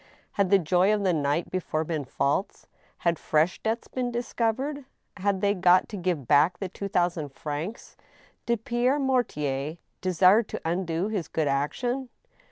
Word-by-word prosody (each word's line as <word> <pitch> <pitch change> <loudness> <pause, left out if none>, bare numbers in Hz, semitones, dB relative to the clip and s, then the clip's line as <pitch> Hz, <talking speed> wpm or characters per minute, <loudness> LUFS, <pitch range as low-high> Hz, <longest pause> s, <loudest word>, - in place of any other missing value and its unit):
Had 200 -2 +1
the 200 - +6
joy 180 +3 +3
of 210 -1 +1
the 185 -2 +2
night 150 +2 0
before 165 -4 -1
been 155 -3 -3
false? 140 +8 -1 0.3
Had 170 -2 0
fresh 155 +4 +1
debts 225 +1 -2
been 250 -1 -2
discovered? 245 +4 -2 0.3
Had 195 0 0
they 200 0 +3
got 180 -1 +4
to 215 - -6
give 175 - -2
back 155 +6 +4
the 195 - -3
two 200 +2 -5
thousand 175 -5 0
francs? 150 - -6 0.5
Did 235 -2 0
Pierre 245 +4 +2
Mortier 155 - -1 0.2
desire 185 +3 +5
to 220 - -6
undo 170 +2 -1
his 195 -8 -2
good 160 -2 -1
action 245 - -1
185 Hz, 160 wpm, -27 LUFS, 160-220 Hz, 0.5 s, the